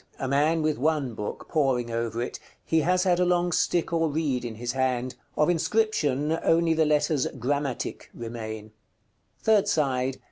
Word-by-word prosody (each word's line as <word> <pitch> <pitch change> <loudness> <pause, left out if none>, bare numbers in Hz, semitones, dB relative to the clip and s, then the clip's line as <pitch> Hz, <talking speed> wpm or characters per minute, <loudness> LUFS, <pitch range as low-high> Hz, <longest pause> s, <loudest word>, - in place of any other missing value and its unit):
_ - - -31
A 135 - -3
man 150 +4 +2
with 155 -3 0
one 145 -3 0
book, 105 -1 -6
poring 130 -6 +1
over 115 0 -2
it: - - -6 0.3
he 160 - +2
has 180 +3 +2
had 180 -2 +2
a - - +4
long 175 0 +2
stick 170 +1 +1
or 165 -1 +2
reed 145 -5 -1
in 115 -2 -5
his 120 +2 -3
hand. 130 -1 -1 0.2
Of 150 - +4
inscription 165 -5 +1
only 165 0 +3
the 160 0 +3
letters 150 -2 +2
"GRAMMATIC" 135 +1 -2
remain. 110 -2 -7 0.7
_Third 210 -2 +4
side. 135 -7 0
145 Hz, 170 wpm, -26 LUFS, 125-165 Hz, 0.7 s, a